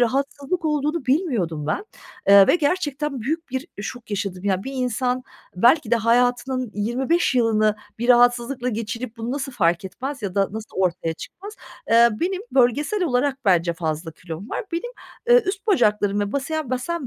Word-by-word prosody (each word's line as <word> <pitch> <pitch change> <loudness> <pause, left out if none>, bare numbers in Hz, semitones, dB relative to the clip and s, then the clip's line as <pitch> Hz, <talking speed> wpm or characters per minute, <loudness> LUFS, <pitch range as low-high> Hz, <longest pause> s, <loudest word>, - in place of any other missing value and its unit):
rahatsızlık 280 +7 -1
olduğunu 300 -1 -1
bilmiyordum 230 - 0
ben, 390 - -1 0.4
eee, 200 -1 +9
ve - - +4
gerçekten 295 -4 -1
büyük 315 +6 -3
bir 265 +6 -4
şok 235 +2 -7
yaşadım. 195 -2 -3
Yani, 190 -1 0
bir 270 - -5
insan 255 0 -1 0.3
belki 240 - +4
de 235 - +5
hayatının 245 +1 +1
25 260 +10 0
yılını 215 -3 +2 0.2
bir 240 - -2
rahatsızlıkla 245 +1 +3
geçirip 230 +1 -4
bunu 230 +1 -4
nasıl 275 -1 -4
fark 170 -5 +1
etmez 265 +8 -6
ya 195 -3 -4
da 195 -1 +2
nasıl 220 0 -8
ortaya 175 -3 0
çıkmaz? 405 - -10 0.3
Eee, 235 +1 +7
benim 375 +3 -1
bölgesel 290 - +2
olarak 265 -1 +1
bence 175 -3 +3
fazla 160 0 -3
kilom 170 +6 -9
var. - - -3
Benim, 485 +9 -3 0.4
eee, 485 0 +7
üst 390 +3 -3
bacaklarım 210 - +2
ve 205 0 -2
basem 280 0 -2
basen 265 +4 -2
245 Hz, 160 wpm, -22 LUFS, 210-290 Hz, 0.4 s, eee